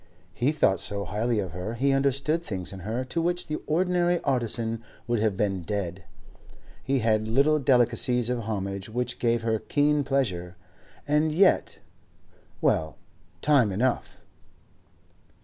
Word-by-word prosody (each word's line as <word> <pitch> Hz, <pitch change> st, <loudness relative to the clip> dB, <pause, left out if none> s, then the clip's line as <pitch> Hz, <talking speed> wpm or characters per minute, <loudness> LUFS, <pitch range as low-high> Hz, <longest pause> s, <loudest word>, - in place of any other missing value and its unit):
He 125 Hz, +8 st, +1 dB
thought 95 Hz, -, +2 dB
so 100 Hz, +2 st, -1 dB
highly 115 Hz, +2 st, -1 dB
of 95 Hz, -4 st, -2 dB
her, 90 Hz, +7 st, -5 dB
he 135 Hz, +4 st, +1 dB
understood 140 Hz, +4 st, +1 dB
things 95 Hz, -, -3 dB
in 95 Hz, -, -8 dB
her 110 Hz, +7 st, -3 dB
to 165 Hz, +6 st, -2 dB
which 175 Hz, +1 st, -1 dB
the 155 Hz, -1 st, -4 dB
ordinary 175 Hz, +1 st, +2 dB
artisan 115 Hz, -4 st, -1 dB, 0.2 s
would 120 Hz, -1 st, 0 dB
have 105 Hz, -3 st, 0 dB
been 95 Hz, -3 st, 0 dB
dead; 90 Hz, -1 st, -4 dB, 0.8 s
he 135 Hz, +1 st, 0 dB
had 110 Hz, -1 st, +2 dB
little 140 Hz, +7 st, +3 dB
delicacies 125 Hz, -2 st, +3 dB
of 125 Hz, 0 st, 0 dB
homage 100 Hz, -3 st, -4 dB
which 120 Hz, +2 st, -3 dB
gave 115 Hz, -1 st, +1 dB
her 110 Hz, -1 st, 0 dB
keen 145 Hz, +3 st, +1 dB
pleasure. 95 Hz, -11 st, -1 dB, 0.5 s
And 150 Hz, +2 st, +2 dB
yet—well, 155 Hz, -, -1 dB, 0.5 s
time 140 Hz, -8 st, +4 dB
enough! 120 Hz, +6 st, -1 dB
120 Hz, 135 wpm, -26 LUFS, 105-140 Hz, 0.8 s, time